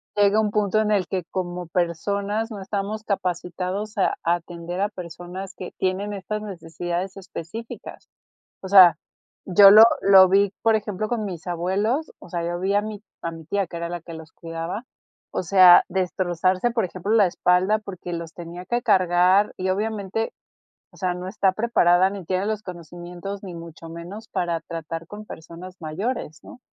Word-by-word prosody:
llega 205 +1 +4
un 215 -1 +2
punto 210 0 +1
en 215 -1 +1
el 200 -3 +2
que 185 -3 -2
como 180 -1 -4
personas 200 +6 -1
no 205 -3 -7
estamos 205 +2 -3
capacitados 185 +2 -3
a 190 - +2
a 170 +1 +3
atender 175 +1 -6
a 205 - +1
personas 180 +1 -8
que 185 - -7
tienen 190 +2 -1
estas 210 +2 -4
necesidades 175 -1 -5
específicas. 195 +4 -8 0.5
O 190 - -6
sea, 185 -5 +8 0.5
yo 195 +2 +8
lo 215 +2 +10 0.2
lo 190 -1 +8
vi, 200 +1 +4
por 225 0 +4
ejemplo, 210 -1 -2
con 230 -3 -1
mis 180 -3 -7
abuelos, 200 - -1
o - - -14
sea, 170 0 -3
yo 175 0 -3
vi, 195 +2 0
a 205 - +4
mi 210 -1 -6 0.2
a 170 - -2
mi 165 -1 -10
tía, 200 +3 0
que 170 0 -8
era 170 0 -4
la 175 -1 -5
que 165 +1 -10
los 160 0 -10
cuidaba. 165 +6 -5 0.5
O - - -1
sea, 180 0 +8
destrozarse, 185 +3 0
por 225 -5 0
ejemplo, 185 +4 -5
la 215 -3 +6
espalda 180 +4 +2
porque 185 -4 -7
los 165 -1 -6
tenía 175 +1 -9
que 240 +5 -1
cargar 185 +1 +3
y 185 0 -2
obviamente, 210 +2 -2 0.6
o - - -19
sea, 185 -2 -1
no 180 +1 -6
está 195 -1 +1
preparada, 190 -4 +3
ni 195 -3 -7
tiene 185 +3 -1
los 215 0 -2
conocimientos 175 +2 -8
ni 185 -3 -7
mucho 165 -1 -10
menos 175 +7 -9
para 170 -2 -1
tratar 165 0 -6
con 210 +1 -9
personas 175 0 -10
mayores, 160 +1 -4
¿no? - - -13
185 Hz, 175 wpm, -23 LUFS, 175-205 Hz, 0.6 s, lo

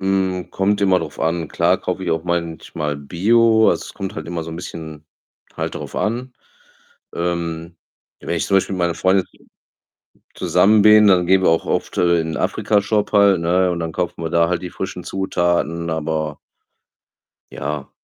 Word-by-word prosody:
Hm, 95 -1 -1
kommt 100 +2 0
immer 95 -2 +3
drauf - - -7
an. 80 -1 -1
Klar - - +2
kaufe - - -4
ich - - -1
auch 80 0 -1
manchmal 80 -3 -3
Bio. 110 +9 +3
Also, - - -2
es - - -11
kommt 95 -2 -5
halt 80 - -6
immer 85 -1 -4
so 80 - -8
'n 80 - -7
bisschen 80 -4 -8 0.5
halt - - -3
drauf - - -7
an. 120 +4 -2 0.8
Ähm, 85 -1 -3 0.4
wenn 85 - -3
ich - - -1
zum 95 - +3
Beispiel 95 - 0
mit 95 - -5
meiner 85 -1 +1
Freundin 95 +2 +2
zus - - -24 1.0
zusammen 105 +1 +3
bin, 105 0 +7
dann 90 -3 +4
gehen 95 +1 +4
wir - - +5
auch 80 - +1
oft, - - -2
äh, 85 -1 +3
in 80 0 -4
Afrika-Shop 105 0 0
halt, 100 -4 +5
ne, 90 +2 +2
und 85 - -3
dann 80 -1 -3
kaufen 90 0 -3
wir 80 - -2
da 85 0 +3
halt 90 -1 -1
die 90 - -5
frischen 90 -2 -6
Zutaten, 85 -3 -1
aber 80 -1 -2 1.1
Ja. 75 -1 -5
85 Hz, 180 wpm, -20 LUFS, 80-95 Hz, 1.1 s, bin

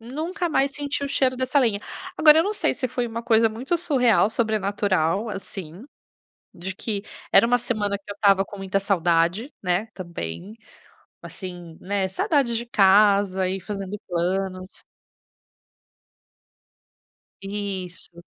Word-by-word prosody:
Nunca 315 - -3
mais 275 -4 +1
senti 285 0 -3
o - - -1
cheiro 265 -2 +1
dessa 260 +2 +1
lenha. 225 -6 +1 0.4
Agora 305 0 +7
eu - - +3
não 410 +3 -1
sei, - - 0
se 265 -3 -2
foi 245 0 -2
uma 230 +1 -5
coisa 225 -1 +4
muito 245 +10 -2
surreal, 250 - +3
sobrenatural, 205 -4 0
assim, 190 -2 -7 0.7
de 185 +2 -6
que 205 0 -3 0.3
era 195 +4 +7
uma 245 +1 +3
semana, 210 -4 -1
que 200 0 -13
eu - - -4
estava 195 -2 +4
com 205 - -11
muita 195 0 -1
saudade, 180 - +1
né, 180 +3 0
também, 175 - -7 0.7
assim, 175 -3 -8
né, 195 0 -1
saudade 240 - 0
de 235 +1 -2
casa 195 -2 +4
e 190 +1 -2
fazendo 200 +1 -6
planos. 185 +1 -3 2.6
Isso. 190 -4 -3
205 Hz, 135 wpm, -24 LUFS, 190-240 Hz, 2.6 s, Agora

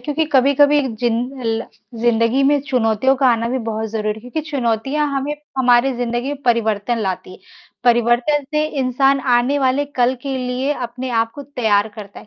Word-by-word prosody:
क्योंकि 295 +5 -1
कभी-कभी 285 +2 +4 0.2
जिन 240 -2 +1 0.3
ल 225 0 0 0.4
ज़िंदगी 235 +2 +2
में 285 +1 +3
चुनौतियों 250 -1 +2
का 265 0 +2
आना 230 -1 +1
भी 260 +2 -1
बहुत 220 0 -3
ज़रूरी 215 -1 -2
है, 220 - -11
क्योंकि 250 +7 -4
चुनौतियाँ 270 +2 0
हमें 280 +2 -2 0.2
हमारी 250 +1 +4
ज़िंदगी 240 +1 -2
में 285 -1 -9
परिवर्तन 230 -2 0
लाती। 185 -3 -4 0.5
परिवर्तन 240 +5 +2
से 300 0 +2 0.2
इंसान 270 +2 +2
आने 250 +2 +2
वाले 265 +1 +1
कल 250 +1 +3
के 275 -1 -3
लिए 255 +2 -1
अपने 250 -1 -5
आप 225 -1 +1
को 285 - -8
तैयार 220 -7 0
करता 205 -2 -10
है, - - -17
250 Hz, 170 wpm, -19 LUFS, 230-275 Hz, 0.5 s, कभी-कभी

